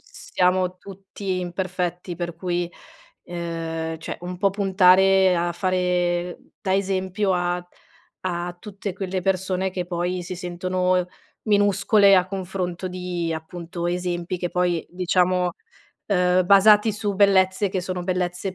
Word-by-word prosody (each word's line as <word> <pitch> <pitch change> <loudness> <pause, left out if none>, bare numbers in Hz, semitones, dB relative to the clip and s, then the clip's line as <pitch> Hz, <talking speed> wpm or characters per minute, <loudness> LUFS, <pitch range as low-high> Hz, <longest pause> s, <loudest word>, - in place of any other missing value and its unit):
s - - -15
siamo 185 0 +2
tutti 195 0 -6
imperfetti, 180 0 -3
per 175 -1 -5
cui, 175 0 -2 0.5
uhm, 165 -2 -4
cioè, 160 - -6
un 180 +1 -6
po' 195 +1 +3
puntare 190 -1 +4
a 175 0 0
fare 180 -1 0 0.2
da 190 -1 0
esempio 190 0 0
a 175 0 -1 0.5
a 175 -1 -3
tutte 200 -1 -6
quelle 190 -1 -3
persone 190 0 0
che 180 -1 -4
poi 175 +1 -2
si 185 - -5
sentono, 180 +1 -1
ehm, 180 -1 0 0.4
minuscole 205 -1 +4
a 180 -1 +3
confronto 185 -1 -4
di, 180 -2 -3
appunto, 170 +2 -5
esempi 175 0 -2
che 175 0 -3
poi 175 -2 0
diciamo, 180 0 +1 0.5
uhm, 180 -2 +3
basati 210 +3 +6
su 205 -1 -2
bellezze 195 0 +3
che 185 0 -2
sono 180 0 -4
bellezze 180 +1 -2
180 Hz, 135 wpm, -23 LUFS, 175-190 Hz, 0.5 s, basati